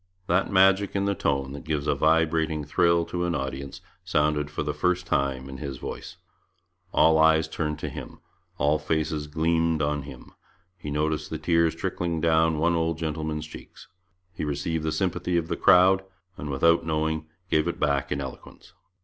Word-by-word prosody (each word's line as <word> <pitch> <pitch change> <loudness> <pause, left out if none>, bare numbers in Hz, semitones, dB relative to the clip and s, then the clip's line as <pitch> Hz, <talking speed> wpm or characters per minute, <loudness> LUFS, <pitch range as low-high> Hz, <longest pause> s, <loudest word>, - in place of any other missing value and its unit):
That 90 +3 +1
magic 95 +1 +4
in 100 0 +1
the 100 - +1
tone 70 -6 -1
that 70 0 -8
gives 75 -2 -2
a - - +2
vibrating 80 -1 +1
thrill 85 +3 +2
to 90 +1 -3
an 85 -1 -1
audience 70 +1 -5 0.2
sounded 75 -4 +1
for 75 - -3
the 75 0 -2
first 90 +4 0
time 65 -4 -1
in 70 -1 -8
his 70 -3 -6
voice. - - -7 0.7
All 80 -4 +4
eyes 80 0 +4
turned 75 -2 -3
to - - -5
him; - - -9 0.4
all 75 +1 +2
faces 75 0 -2
gleamed 80 0 +1
on 75 0 0
him; 70 -2 -12 0.4
he 80 -5 -8
noticed 75 +1 -1
the 80 - -3
tears 85 +1 +2
trickling 85 -2 -2
down 80 0 +3
one 85 +3 +2
old 80 -1 0
gentleman's 80 -1 -3
cheeks; 80 - -13 0.4
he - - -5
received 75 +2 -2
the 80 - -1
sympathy 90 -1 -1
of 85 -1 -2
the - - 0
crowd, 95 +1 +5 0.3
and 75 - -7
without 85 +5 +3
knowing 80 -1 -1 0.2
gave 75 +2 +2
it 85 - -3
back 70 -2 0
in - - -1
eloquence. - - -9
80 Hz, 175 wpm, -26 LUFS, 75-85 Hz, 0.7 s, crowd